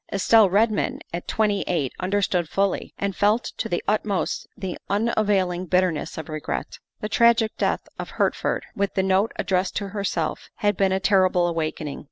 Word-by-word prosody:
Estelle 205 +1 +5
Redmond 215 +3 +1
at 170 - -5
twenty 210 -2 +1
eight 150 -8 -1
understood 185 -3 0
fully, 195 0 0
and 200 -1 -2
felt 210 +3 +2
to - - -3
the 175 - -1
utmost 205 -4 -1
the 190 -4 -4
unavailing 200 -4 +1
bitterness 180 -3 0
of 160 - -6
regret. 155 -1 -4 0.2
The 210 - -2
tragic 230 0 +3
death - - 0 0.2
of - - -5
Hertford, - - 0
with 200 0 -1
the 190 - +2
note 190 +3 +2
addressed 185 0 0
to 200 -1 -2
herself, 200 -1 -3
had 205 -1 +1
been 190 0 +2
a 190 - +1
terrible 185 -3 +3
awakening. 155 -3 -3
195 Hz, 165 wpm, -24 LUFS, 180-205 Hz, 0.2 s, Estelle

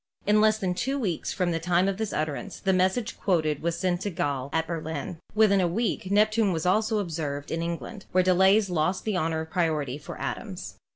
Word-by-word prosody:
In 210 +1 +4
less 215 0 +4
than 185 -4 -1
two 265 +9 -1
weeks 190 - -2
from 180 -3 0
the 165 - -1
time 175 +2 +2
of 195 -1 -1
this 220 -1 -2
utterance 155 +5 -3
the 190 - +1
message 190 +5 +1
quoted 155 -6 +1
was 170 0 -1
sent 175 0 0
to 205 - -1
Galle 145 -7 -2
at 160 0 0
Berlin. 160 -1 -4 0.2
Within 205 -3 +5
a 180 - +2
week 190 +1 -1
Neptune 215 0 +3
was 165 -1 -2
also 215 +4 +2
observed 155 -7 -3
in 165 - -1
England, 170 +5 -5
where 185 0 +4
delays 190 +2 +4
lost 175 +3 0
the 215 -3 -1
honor 160 -2 0
of 160 0 -8
priority 150 -6 0
for - - -9
Adams. - - -5
180 Hz, 210 wpm, -27 LUFS, 160-200 Hz, 0.2 s, Within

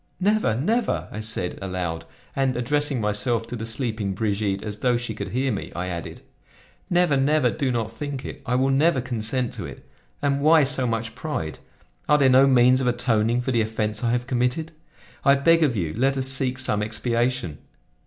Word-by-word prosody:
Never! 205 - +2
never!" 220 - 0
I 105 - -6
said 110 -5 -3
aloud; 90 -4 -3 0.3
and, 135 -2 +1
addressing 145 +2 0
myself 110 +2 0
to 115 - -6
the 115 -1 -5
sleeping 110 -4 -3
Brigitte 100 -1 -1
as 105 -1 -5
though 125 0 +2
she 120 -2 -4
could 100 -2 -5
hear 130 +5 0
me, 100 - -4
I 90 +1 -3
added: 85 -1 -6 0.7
"Never, 175 -4 +3
never; 135 -2 +2
do 135 -4 -1
not 115 -2 -2
think 140 +2 -5
of - - -5
it; - - -15
I 125 - -1
will 135 +2 +2
never 145 +1 +3
consent 120 0 -2
to - - -6
it. - - -11 0.3
And 140 0 0
why 155 +1 +6
so 135 -2 0
much 115 0 -2
pride? 80 - -4 0.5
Are 150 - +6
there 135 -2 +4
no 130 +2 +6
means 130 0 +5
of 130 - 0
atoning 120 -1 +1
for 130 - -2
the 120 -2 +2
offense 110 -1 -2
I 120 - +2
have 120 +1 0
committed? 125 +6 -1 0.5
I 140 -1 +6
beg 165 +4 +4
of 145 -7 +2
you 85 -6 -2
let 135 +4 +1
us 130 0 0
seek 130 -1 +1
some 105 -5 0
expiation. 115 - -1
125 Hz, 195 wpm, -24 LUFS, 110-135 Hz, 0.7 s, why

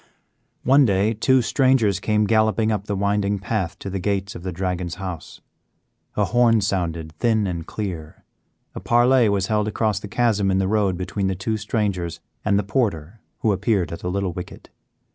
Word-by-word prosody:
One 140 +3 +5
day 105 -1 +2
two 130 +3 +3
strangers 125 -8 +2
came 105 +2 +1
galloping 110 +1 +2
up 105 -2 -2
the 105 - -2
winding 100 +1 0
path 100 -3 -3
to - - -8
the 95 0 -3
gates 100 0 -2
of - - -9
the 90 +1 -4
Dragon's 90 -1 -3
house. 90 -4 -7 0.7
A 105 - +2
horn 115 0 +3
sounded 85 -5 -2
thin 110 -3 +2
and 85 -4 -4
clear, 85 -7 -6 0.5
a - - -6
parley 120 0 +4
was 100 -2 +1
held 105 0 0
across 110 -1 0
the - - -8
chasm 105 -2 +1
in 95 - +2
the 95 0 +1
road 100 -3 +1
between 95 +2 -2
the 95 - -1
two 110 +5 -2
strangers 100 -6 -2 0.2
and 100 -2 +2
the 105 - +1
porter 100 - -2 0.2
who 110 - +2
appeared 100 -3 0
at 85 - -6
the 90 - -4
little 95 -1 -2
wicket. 90 +1 -9
100 Hz, 180 wpm, -22 LUFS, 95-110 Hz, 0.7 s, One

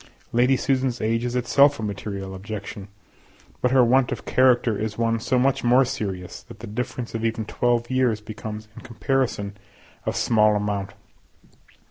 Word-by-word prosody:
Lady 125 +3 +3
Susan's 130 -2 0
age 115 +2 0
is 125 0 -2
itself 140 +3 +4
a - - -4
material 100 -2 -5
objection, 100 0 -7 0.7
but 125 - +3
her 130 -1 +5
want 125 +1 +3
of - - -5
character 125 -3 +3
is 110 +1 -3
one 115 0 +1
so 125 +3 0
much 130 +2 +2
more 125 +2 +5
serious, 100 -8 -5
that 115 - -13
the 115 - -7
difference 120 +2 -4
of 115 0 -3
even 115 -1 -1
twelve 120 +1 0
years 125 -4 +2
becomes 110 0 -7
in - - -10
comparison 115 -4 -1 0.5
of - - 0
small 110 -2 +3
amount. 100 -1 -2
115 Hz, 160 wpm, -24 LUFS, 105-125 Hz, 0.7 s, her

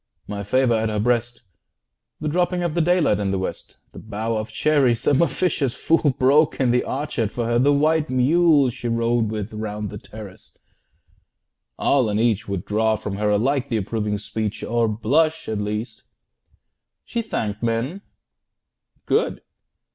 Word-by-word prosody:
My 100 -1 -4
favour 125 +4 +2
at 110 0 +1
her 105 -1 -1
breast, 120 +1 0 0.8
The 155 - -2
dropping 175 +3 0
of 170 -3 -1
the 170 - +1
daylight 175 - +2
in 100 -1 -1
the 95 - 0
West, 95 - -6
The - - -10
bough 110 +2 -3
of 110 +1 -3
cherries 135 -3 +2
some 145 +1 +3
officious 160 -7 0
fool 155 -5 +2
Broke 145 +4 +3
in 130 -3 +3
the 125 0 +2
orchard 130 -6 -2
for 120 - -3
her, 120 +1 +1
the 140 +3 +4
white 155 +2 +2
mule 140 +1 +4
She 120 0 -6
rode 115 -1 +1
with 110 0 -4
round 105 -1 -4
the 105 - -7
terrace 105 -3 -12 1.2
all 130 -5 +2
and 105 +1 0
each 110 -3 +1
Would 100 -3 -3
draw 110 +1 +1
from 100 -2 -5
her 105 0 0
alike 130 +6 +1
the 115 - 0
approving 105 0 -2
speech, 105 0 -4
30 - - -4
Or 120 -1 +2
blush, 150 +10 +1
at 110 -2 -2
least. 105 +2 -4 1.0
She 235 - -2
thanked 110 - -3
men 120 +11 -1 1.0
good! - - 0
120 Hz, 165 wpm, -22 LUFS, 105-145 Hz, 1.2 s, the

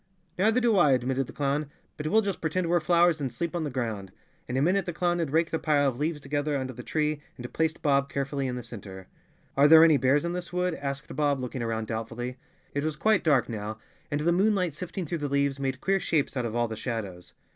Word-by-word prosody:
"Neither 220 +5 +4
do 235 -3 +3
I," 150 -6 +5
admitted 130 +1 0
the - - -9
clown, 145 +1 -1 0.3
"but 150 - -4
we'll 220 +7 +3
just 200 -2 -3
pretend 170 +2 -1
we're 175 +1 +3
flowers, 170 0 +3
and 135 -3 -2
sleep 170 +8 -3
on 170 - -1
the - - -2
ground." 110 -7 -4 0.4
In 125 - -2
a - - +2
minute 190 +4 +2
the 175 - -2
clown 175 +1 0
had 165 -4 -1
raked 160 +3 +1
a 160 - +1
pile 145 -2 +2
of 130 -2 -2
leaves 155 +1 -1
together 145 +1 -1
under 130 -1 -4
the 125 - -8
tree 150 +2 -1 0.2
and 120 0 -8
placed 160 0 -1
Bob 140 -2 +2
carefully 140 0 -2
in 125 - -3
the 125 - -5
center. 95 -5 -9 0.5
"Are 140 +1 +6
there 160 +1 +9
any 160 -3 +6
bears 140 +4 +2
in 170 - -2
this 180 0 -5
wood?" 180 0 0
asked 140 -1 -5
Bob, 145 -2 +1
look¬ 125 -1 -5
ing 130 - -3
around 115 -1 -2
doubtfully. 115 +3 -4 0.4
It 145 - -1
was 155 -1 -1
quite 215 +5 +2
dark 145 -7 +3
now, 110 -1 -5 0.3
and 145 -1 -1
the 170 +3 +2
moonlight 185 -2 +2
sifting 180 +3 -5
through 165 +2 -3
the 145 -1 -2
leaves 140 0 +1
made 135 -1 -2
queer 195 0 +2
shapes 155 -6 0
out 125 -2 -1
of 115 - -6
all 120 0 +1
the 110 - -5
shadows. 105 -7 -5
145 Hz, 245 wpm, -27 LUFS, 125-170 Hz, 0.5 s, there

